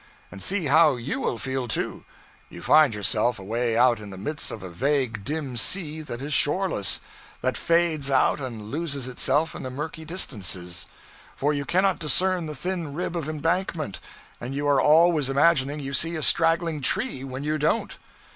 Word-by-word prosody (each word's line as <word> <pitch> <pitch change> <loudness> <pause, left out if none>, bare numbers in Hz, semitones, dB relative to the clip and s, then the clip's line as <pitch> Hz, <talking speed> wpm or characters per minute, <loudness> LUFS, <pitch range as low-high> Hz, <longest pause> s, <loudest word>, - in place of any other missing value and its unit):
And 100 - -9
see 190 - 0
how 150 0 +5
you 125 +3 -3
will 120 - -1
feel, 130 0 -3
too! 110 - -2 0.4
You - - -10
find 150 -7 +5
yourself 110 +3 0
away 115 +4 -1
out 120 -1 +4
in 105 -1 -9
the 95 - -9
midst 150 +10 -3
of 110 - -7
a 95 - -6
vague 125 - 0
dim 145 0 -4
sea 155 +4 -1
that 130 -4 -7
is 150 +1 -2
shoreless, 145 - +1 0.4
that 130 0 +1
fades 165 -4 +1
out 135 +2 +2
and 115 -5 -6
loses 140 -4 -2
itself 145 +5 +1
in - - -7
the 130 - -5
murky 150 +5 -6
distances; 95 - -3 0.5
for 145 +2 +1
you 140 -1 -2
cannot 190 +3 +2
discern 175 +3 +1
the 150 - -6
thin 170 -2 -4
rib 175 +1 -3
of 160 -3 -3
embankment, 165 - -2 0.4
and 125 +3 -5
you 145 +1 -1
are 140 -2 +4
always 155 -2 +4
imagining 140 0 +3
you 140 -1 -5
see 165 +5 +1
a 155 - -3
straggling 165 -2 +2
tree 185 - 0
when 135 0 -6
you 155 +1 -1
don't. 160 +10 0
145 Hz, 180 wpm, -25 LUFS, 125-165 Hz, 0.5 s, how